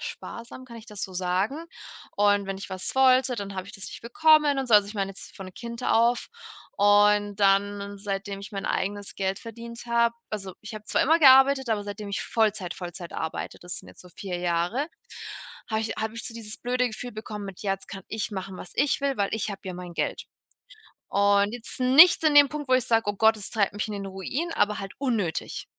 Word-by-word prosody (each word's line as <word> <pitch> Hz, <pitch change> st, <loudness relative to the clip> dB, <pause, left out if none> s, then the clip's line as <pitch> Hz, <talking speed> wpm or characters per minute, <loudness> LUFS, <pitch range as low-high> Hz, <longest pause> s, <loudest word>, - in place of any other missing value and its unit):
sparsam, 235 Hz, +2 st, -8 dB
kann 235 Hz, -2 st, -11 dB
ich 225 Hz, 0 st, -12 dB
das 210 Hz, -2 st, -8 dB
so 190 Hz, -, -4 dB
sagen? 190 Hz, -, -1 dB, 0.5 s
Und 205 Hz, -1 st, +3 dB
wenn 195 Hz, 0 st, -4 dB
ich 195 Hz, -, -8 dB
was 185 Hz, +5 st, -5 dB
wollte, 260 Hz, -1 st, +4 dB
dann 200 Hz, -2 st, -5 dB
habe 185 Hz, 0 st, -5 dB
ich -, -, -10 dB
das 200 Hz, -, -9 dB
nicht -, -, -9 dB
bekommen 300 Hz, +3 st, +4 dB
und 265 Hz, -, -1 dB
so. 225 Hz, -, +5 dB
Also, 205 Hz, -1 st, +6 dB
ich 210 Hz, -, -9 dB
meine 195 Hz, -1 st, -1 dB
jetzt -, -, -13 dB
von 190 Hz, -1 st, -9 dB
Kind 235 Hz, 0 st, -7 dB
auf. 235 Hz, +2 st, +2 dB, 0.5 s
Und 205 Hz, 0 st, +4 dB
dann, 200 Hz, +1 st, +2 dB
seitdem 195 Hz, 0 st, -4 dB
ich 200 Hz, -, -9 dB
mein 195 Hz, -1 st, -4 dB
eigenes 200 Hz, +1 st, -2 dB
Geld 190 Hz, 0 st, -1 dB
verdient 235 Hz, +1 st, -9 dB
habe 235 Hz, 0 st, +2 dB, 0.2 s
also, 195 Hz, -3 st, -5 dB
ich 215 Hz, +1 st, -9 dB
habe 215 Hz, 0 st, -8 dB
zwar -, -, +1 dB
immer 320 Hz, +4 st, +4 dB
gearbeitet, 265 Hz, -1 st, +7 dB
aber 210 Hz, -2 st, 0 dB
seitdem 205 Hz, 0 st, -6 dB
ich 200 Hz, -, -2 dB
Vollzeit-Vollzeit 185 Hz, -5 st, -2 dB
arbeite, 160 Hz, -, -4 dB
das 175 Hz, 0 st, -6 dB
sind -, -, -14 dB
jetzt -, -, -15 dB
so 180 Hz, -, -14 dB
4 180 Hz, +1 st, -5 dB
Jahre, 175 Hz, -, 0 dB, 0.8 s
habe 220 Hz, 0 st, +1 dB
ich 225 Hz, 0 st, -3 dB
habe 220 Hz, 0 st, -3 dB
ich 230 Hz, -, -6 dB
so 230 Hz, -, -8 dB
dieses 225 Hz, -1 st, -8 dB
blöde 250 Hz, 0 st, 0 dB
Gefühl 245 Hz, +2 st, -7 dB
bekommen, 215 Hz, -1 st, -7 dB
mit 195 Hz, -2 st, -9 dB
„jetzt 195 Hz, -2 st, -2 dB
kann 195 Hz, -, -8 dB
ich 220 Hz, 0 st, -3 dB
machen, 190 Hz, -1 st, -5 dB
was 180 Hz, -, -10 dB
ich 285 Hz, +1 st, +1 dB
will, 275 Hz, -1 st, 0 dB
weil 200 Hz, -1 st, +1 dB
ich 220 Hz, -1 st, -2 dB
habe 200 Hz, -, -7 dB
ja 185 Hz, -1 st, -5 dB
mein 180 Hz, -1 st, -8 dB
Geld.“ -, -, -2 dB, 0.8 s
Und 200 Hz, +1 st, +3 dB
jetzt 240 Hz, -1 st, -9 dB
nichts 280 Hz, +8 st, +7 dB
in 305 Hz, -1 st, +4 dB
dem 290 Hz, -1 st, +8 dB
Punkt, 295 Hz, -1 st, -6 dB
wo 255 Hz, -, +5 dB
ich 255 Hz, -2 st, +2 dB
sage: 225 Hz, -1 st, +3 dB
„Oh -, -, -7 dB
Gott, 220 Hz, +2 st, +5 dB
das 205 Hz, -, -8 dB
treibt 205 Hz, -4 st, +1 dB
mich 210 Hz, -, -2 dB
in -, -, -4 dB
den 200 Hz, -1 st, -5 dB
Ruin“, 220 Hz, -, -4 dB
aber 210 Hz, 0 st, +1 dB
halt 195 Hz, -1 st, -7 dB
unnötig. 225 Hz, -12 st, -2 dB
210 Hz, 220 wpm, -26 LUFS, 195-235 Hz, 0.8 s, dem